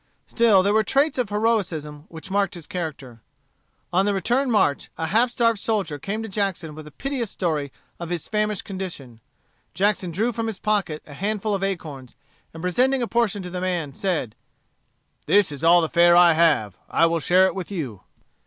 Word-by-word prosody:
Still 220 -5 +4
there 200 +1 +2
were 220 - +4
traits 275 +6 +1
of 240 -5 0
heroism 180 -9 -1
which 165 +3 -10
marked 200 -2 0
his 170 -3 -8
character. 150 - -6 0.7
On 190 +3 +3
the 205 - +1
return 245 +7 +1
march, 205 -11 +1
a 160 - -2
half 225 +9 +2
starved 230 -3 +1
soldier 195 -10 -2
came 215 +8 -4
to - - -5
Jackson 190 -6 -2
with 155 0 -10
a - - -11
piteous 260 - -3
story 155 -8 -2 0.3
of 170 -1 -6
his 175 -3 -3
famished 210 -2 -1
condition. 170 - -7 0.5
Jackson 195 0 +1
drew 215 +9 0
from 230 0 -3
his 220 -4 -4
pocket 200 -8 -1
a 145 - -12
handful 210 +5 -2
of 195 -1 -2
acorns, 150 -10 -5 0.4
and 165 +1 -10
presenting 255 +8 +2
a - - -2
portion 220 -4 0
to 180 - -7
the 180 0 -4
man, 175 -6 -2
said: 160 - -2 0.9
"This 200 -5 +4
is 145 +2 -7
all 170 +1 +6
the 160 - 0
fare 170 +1 +5
I 175 -1 +7
have. 150 - +2
I 165 - +3
will 165 0 +1
share 180 +4 +4
it - - 0
with 190 -3 -6
you." 135 - -5
185 Hz, 190 wpm, -23 LUFS, 160-210 Hz, 0.9 s, I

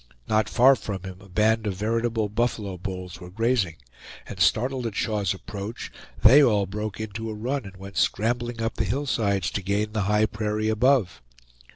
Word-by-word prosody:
Not 110 -1 +2
far 130 +2 +6
from 100 -6 -5
him 95 0 -8
a 95 - -15
band 110 +3 +2
of 100 - -2
veritable 115 +2 0
buffalo 105 -2 -1
bulls 90 0 -7
were 90 - -9
grazing; 110 -3 0 0.5
and - - -9
startled 125 +1 +2
at 110 - -6
Shaw's 105 -3 0
approach, 100 +3 -6 0.3
they 130 +7 +9
all 105 -6 +3
broke 105 +2 -5
into 110 +1 -5
a 110 - -5
run, 125 +4 -2
and 100 -1 -10
went 95 0 -9
scrambling 120 +2 0
up 115 - -2
the - - +1
hillsides 110 -9 0
to 100 - -2
gain 100 +3 -1
the 110 -1 -1
high 105 +1 +4
prairie 110 0 -2
above. 110 - +2
110 Hz, 180 wpm, -25 LUFS, 100-115 Hz, 0.5 s, they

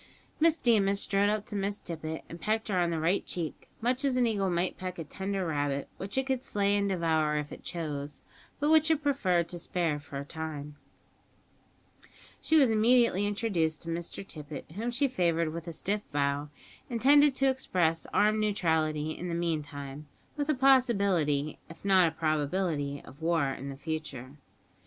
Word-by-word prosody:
Miss 325 0 +4
Deemas 200 -6 +3
strode 200 0 +2
up 210 0 -1
to - - -7
Miss 200 +1 -1
Tippet, 160 -1 -5
and 170 - -10
pecked 220 +1 -1
her 185 -3 +1
on 175 -1 +2
the 165 -1 -1
right 170 +5 +1
cheek, 165 -4 -5
much 250 +3 0
as 275 -2 +2
an 250 -1 +3
eagle 200 -4 +1
might 175 +1 0
peck 185 -1 -6
a 165 - -4
tender 190 +4 -3
rabbit, 145 -3 -1
which 195 +5 -5
it 265 - +2
could 265 -2 -1
slay 200 -3 +1
and 200 0 +1
devour 160 -4 +1
if 150 -1 -3
it - - -10
chose, 150 -4 -4 0.4
but 295 +1 +2
which 315 0 +5
it 310 -2 +2
preferred 185 - +2
to 175 - -4
spare 165 -4 -1
for 145 -1 -8
a 140 - -5
time. 150 -2 -6 1.7
She 320 - +1
was 270 -7 +6
immediately 220 -2 +4
introduced 185 -7 -1
to 165 - -7
Mr 170 +3 -5
Tippet, 150 -1 -8
whom 220 +8 -3
she 260 +4 +2
favoured 170 -8 0
with 170 +1 -6
a - - -3
stiff 200 +6 -1
bow, 145 0 0 0.4
intended 280 +4 +5
to 270 0 +3
express 170 -10 0
armed 215 +1 +3
neutrality 160 -7 +1
in 175 +3 -5
the 170 - -2
meantime; 150 -4 -4 0.3
with 290 0 -2
a 305 - +3
possibility, 200 - +3
if 165 - -13
not 190 -3 +5
a 160 - -4
probability, 155 -2 -1
of 140 - -14
war 165 -4 +2
in 135 +1 -6
the 135 - -7
future. 155 -5 -5
175 Hz, 180 wpm, -30 LUFS, 155-215 Hz, 1.7 s, was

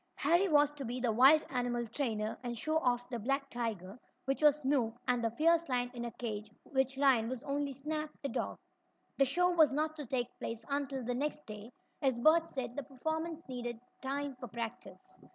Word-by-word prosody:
Harry 345 +7 +3
was 295 -2 +5
to 295 -2 -7
be 245 +1 -3
the 245 -2 +1
wild 270 +7 +7
animal 245 -2 0
trainer, 220 -4 -2
and 240 -1 -4
show 310 +7 0
off 245 -4 +1
the 240 - -2
black 275 +5 -1
tiger, 220 -3 -4 0.3
which 270 +2 -1
was 300 0 +5
Snoop, 255 -5 +1
and 245 -1 +2
the 230 - +2
fierce 330 +6 +3
lion 245 -1 0
in 240 -1 -4
a 235 - -4
cage, 215 -3 -5
which 265 0 0
lion 260 -5 +4
was 255 0 -5
only 285 0 -1
Snap, 305 +3 -3
the 280 - -1
dog. - - -2 0.6
The 275 - +6
show 355 +7 +2
was 315 -5 +5
not 310 +2 0
to 295 -4 -6
take 245 0 -2
place 230 0 -5
until 275 -2 -1
the 245 +1 -1
next 300 +4 -2
day, 215 +2 -9 0.3
as 265 -3 +2
Bert 320 +6 +4
said 245 -3 -4
the 285 - -2
performers 315 +5 -3
needed 240 -2 -5 0.2
time 275 +1 -3
for 245 - -6
practice. 225 -5 -7
265 Hz, 200 wpm, -33 LUFS, 240-290 Hz, 0.6 s, wild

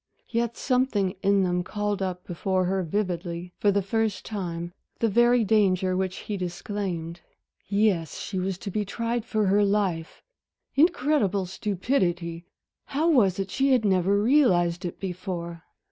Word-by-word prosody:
Yet 235 0 -1
something 250 -8 +1
in 200 0 +3
them 180 -1 0
called 205 +1 -2
up 180 -1 -3
before 185 +2 -1
her 190 +1 0
vividly 175 -1 -3
for 205 - +3
the 200 0 +1
first 220 +1 -1
time 175 -4 -4 0.2
the 230 - +1
very 240 +2 +4
danger 190 -3 +2
which 185 0 -1
he 210 - -3
disclaimed. 175 -2 -4 0.5
Yes, 200 -6 +1
she 190 - -4
was 185 0 -2
to 200 - -6
be 210 +2 0
tried 230 +3 -2
for 215 -3 0
her 200 +2 +4
life! 195 -5 -1 0.5
Incredible 275 - +2
stupidity! 180 -3 -1 0.4
how 315 +5 +1
was 200 - +4
it 195 -1 -3
she 270 0 +2
had 245 -4 +2
never 195 +1 +3
realized 185 - +3
it 175 - -5
before? 180 -3 -5
195 Hz, 145 wpm, -26 LUFS, 180-215 Hz, 0.5 s, very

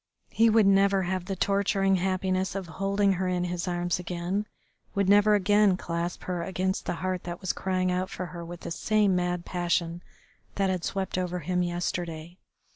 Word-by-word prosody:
He 230 0 +4
would 220 -1 +5
never 195 0 +4
have 185 0 -2
the 195 - -3
torturing 195 0 +2
happiness 185 +1 0
of 195 -1 -3
holding 195 +3 +1
her 185 0 -1
in 180 -1 0
his 175 0 -3
arms 175 0 -1
again, 180 +4 -3 0.5
would 200 -1 +1
never 205 +1 +6
again 205 -1 +4
clasp 170 0 -3
her 180 -2 -3
against 190 +1 -2
the - - -1
heart 185 -1 -1
that 175 0 -5
was 185 - -1
crying 185 -1 0
out 185 +1 -1
for 185 - -5
her 175 -1 -7
with 175 +1 -8
the - - -6
same 210 +2 +2
mad 180 -1 -1
passion 175 -1 -1 0.5
that 195 -1 +1
had 180 -2 -2
swept 190 -1 -2
over 180 -1 -2
him 180 +3 0
yesterday. 175 -1 -3
185 Hz, 185 wpm, -27 LUFS, 175-195 Hz, 0.5 s, never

